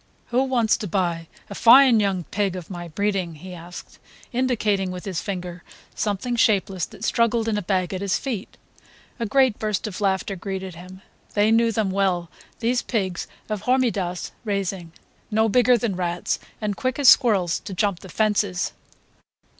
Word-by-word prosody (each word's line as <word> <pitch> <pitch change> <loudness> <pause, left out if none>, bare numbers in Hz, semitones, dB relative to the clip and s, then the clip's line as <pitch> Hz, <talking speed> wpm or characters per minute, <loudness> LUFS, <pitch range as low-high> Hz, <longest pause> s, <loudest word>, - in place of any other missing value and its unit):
"Who 245 +2 +2
wants 240 -4 +2
to 210 - -5
buy 170 -3 -1 0.2
a - - -8
fine 240 +2 +7
young 195 -3 0
pig 200 -2 0
of 180 0 -8
my 175 -1 -6
breeding?" 190 -1 -1
he 180 +5 -10
asked, 175 0 -10 0.3
indicating 215 -6 +1
with 180 0 -7
his 190 -4 -3
finger 180 -3 -5 0.3
something 215 +4 -2
shapeless 195 -6 +2
that - - -13
struggled 230 -1 +1
in 220 - +1
a 210 - -1
bag 185 -1 -1
at 185 - -3
his 200 -1 +1
feet. 235 -8 -5 0.6
A 230 - -1
great 260 -1 +3
burst 215 -1 -1
of 210 -2 -6
laughter 195 0 0
greeted 190 0 -5
him. 185 +3 -12 0.3
They 210 +1 +4
knew 230 0 +4
them 215 -4 0
well, 185 -3 0 0.3
these 240 +2 +1
pigs 190 -7 -2 0.2
of 215 -3 -3
Hormidas' 220 -9 0
raising. 195 -5 -3 0.4
No 220 +1 +2
bigger 250 +2 +4
than 220 -4 -2
rats, 175 -1 -2 0.2
and 210 -2 -2
quick 255 +3 -2
as 285 -2 +2
squirrels 200 -12 +5
to - - -9
jump 190 -1 0
the 190 - -12
fences. 205 -4 0
200 Hz, 170 wpm, -23 LUFS, 185-225 Hz, 0.6 s, fine